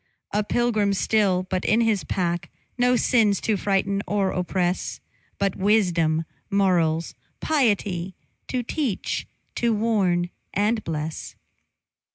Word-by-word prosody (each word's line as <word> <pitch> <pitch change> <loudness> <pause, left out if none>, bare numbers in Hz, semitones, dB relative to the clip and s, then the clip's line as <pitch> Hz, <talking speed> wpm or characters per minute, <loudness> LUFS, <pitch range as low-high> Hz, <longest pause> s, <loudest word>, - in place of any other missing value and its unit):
A 210 +1 +1
pilgrim 215 -3 +1
still, 195 -2 +2
but 185 0 -2
in 225 +2 +3
his 220 -4 +2
pack 175 -2 -2 0.3
No 250 0 +3
sins 220 -4 +3
to 220 - +1
frighten 200 0 0
or 200 -2 +1
oppress; 180 0 -1 0.4
But 195 -1 0
wisdom, 175 -6 +2 0.2
morals, 175 -5 +2 0.3
piety, 205 - 0 0.3
To 250 -1 -2
teach, 250 -3 -2 0.3
to 235 -2 +2
warn 190 -6 +1 0.2
and 215 +2 +1
bless. 155 0 -4
200 Hz, 115 wpm, -24 LUFS, 180-220 Hz, 0.4 s, in